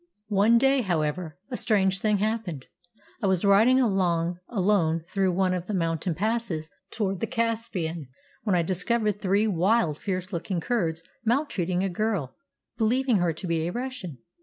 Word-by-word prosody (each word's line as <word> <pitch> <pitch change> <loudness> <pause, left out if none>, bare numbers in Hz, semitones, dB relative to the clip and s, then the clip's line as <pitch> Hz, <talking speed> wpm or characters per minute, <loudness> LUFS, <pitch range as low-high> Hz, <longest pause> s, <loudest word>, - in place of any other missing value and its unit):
One 210 +3 +4
day, 270 +2 +4
however, 165 -3 -2
a 245 - -2
strange 195 -3 +2
thing 210 0 +2
happened. 205 - -2 0.6
I 200 - +1
was 190 0 +1
riding 220 +6 +5
along 180 -6 +1
alone 180 -6 +1
through 190 0 +1
one 185 0 +2
of 180 -1 -3
the 210 - -2
mountain 165 -1 -1
passes 200 -5 -2 0.2
towards 195 -4 -2
the 225 - -1
Caspian 225 - -2 0.3
when 205 -5 +1
I 170 - +2
discovered 205 +4 0
three 200 +2 +2
wild, 190 -4 +2
fierce 185 -1 -3
looking 175 +1 -2
Kurds 165 -6 -1 0.2
maltreating 205 - 0
a - - +1
girl, 180 - -2 0.4
believing 245 +1 +2
her 175 -2 +2
to 160 +4 -7
be 165 -1 0
a - - -2
Russian. 245 - -5
195 Hz, 160 wpm, -26 LUFS, 170-225 Hz, 0.6 s, riding